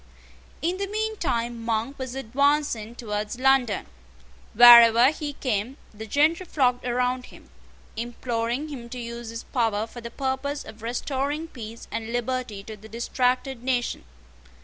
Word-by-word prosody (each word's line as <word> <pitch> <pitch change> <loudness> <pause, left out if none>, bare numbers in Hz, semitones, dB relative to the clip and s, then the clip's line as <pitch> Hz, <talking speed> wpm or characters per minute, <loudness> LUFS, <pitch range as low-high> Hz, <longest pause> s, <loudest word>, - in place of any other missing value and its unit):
In 350 +3 0
the 395 0 -2
mean 435 +2 -2
time 235 -7 -2
Monk 230 +4 -2
was 260 -1 -5
advancing 270 -3 0
towards 210 -1 -4
London. 260 -5 +3 0.7
Wherever 235 +2 +9
he 300 -2 -5
came, 250 -1 -2 0.2
the 220 +1 -8
gentry 310 - +2
flocked 250 -5 +1
round 250 +1 0
him, - - -16 0.4
imploring 235 +4 -3
him 240 -5 -8
to 250 - -7
use 235 -1 -6
his 230 0 -6
power 225 -4 0
for 240 +1 -10
the 235 - -6
purpose 270 +3 -3
of 220 0 -12
restoring 275 +6 -2
peace 230 -3 -9
and 225 0 -4
liberty 245 -4 -3
to 215 +1 -8
the 215 +1 -14
distracted 250 +2 -1
nation. 250 -1 -1
245 Hz, 145 wpm, -25 LUFS, 230-270 Hz, 0.7 s, Wherever